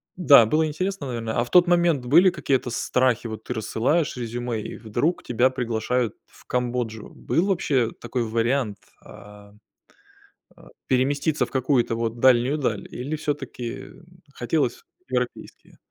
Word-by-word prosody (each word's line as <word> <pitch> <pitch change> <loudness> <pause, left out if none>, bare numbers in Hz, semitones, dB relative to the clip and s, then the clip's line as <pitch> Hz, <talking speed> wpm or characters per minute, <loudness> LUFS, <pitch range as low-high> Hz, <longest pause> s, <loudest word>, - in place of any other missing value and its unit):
Да, 145 -10 +7
было 155 +8 +2
интересно, 185 0 -3
наверно. 115 -2 -3
А - - +2
в - - -13
тот 180 0 +6
момент 170 -7 +2
были 170 +9 +6
какие-то 135 -7 -1
страхи, 125 -2 0
вот 110 0 -7
ты 125 - -3
рассылаешь 125 +8 0
резюме, 120 -1 -3
и - - -7
вдруг 120 +10 -1
тебя 125 +2 +2
приглашают 120 -1 -1
в - - -21
Камбоджу. 120 -3 -3
Был 170 - 0
вообще 140 - +1
такой 120 0 -2
вариант, 115 -1 0 0.2
а, 105 0 -14 1.0
а, - - -18 0.2
переместиться 140 +4 +1
в - - -18
какую-то 130 -3 +1
вот 115 0 -3
дальнюю 130 +3 +4
даль, 110 -7 -2
или 140 +6 -4
всё-таки 135 -6 -5 0.5
хотелось 125 0 -1 0.3
европейские? - - -5
125 Hz, 140 wpm, -24 LUFS, 115-145 Hz, 1.0 s, Да